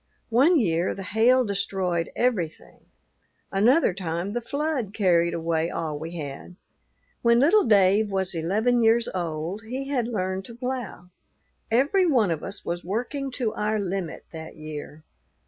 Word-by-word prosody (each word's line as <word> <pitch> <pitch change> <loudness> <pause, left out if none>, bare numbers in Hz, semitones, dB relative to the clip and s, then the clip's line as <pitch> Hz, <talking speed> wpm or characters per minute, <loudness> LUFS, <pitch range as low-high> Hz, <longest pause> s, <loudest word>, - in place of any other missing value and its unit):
One 290 +9 +5
year 170 -5 +1
the 195 - -6
hail 235 +6 +3
destroyed 190 -4 -1
everything; 205 -11 -2 0.7
another 220 - +4
time 175 +1 -3
the 240 - -2
flood 275 -4 -2
carried 170 -4 +2
away 165 0 0
all 155 -4 -3
we 165 +2 -6
had. 145 +3 -7 0.7
"When 235 0 +4
little 335 +11 +5
Dave 205 0 +4
was 190 -1 -1
eleven 215 +9 +1
years 230 +1 +4
old, 170 +2 -3
he 270 +2 -4
had 250 -5 0
learned 190 -4 -2
to 235 - -10
plough. 245 -7 -5 0.6
Every 285 - +3
one 235 - +3
of 160 - -3
us 200 - -6
was 175 +1 -3
working 250 - -3
to 240 -4 -1
our 215 +1 -1
limit 190 -4 -4
that 160 0 -8
year. 155 0 -8
200 Hz, 145 wpm, -25 LUFS, 170-240 Hz, 0.7 s, One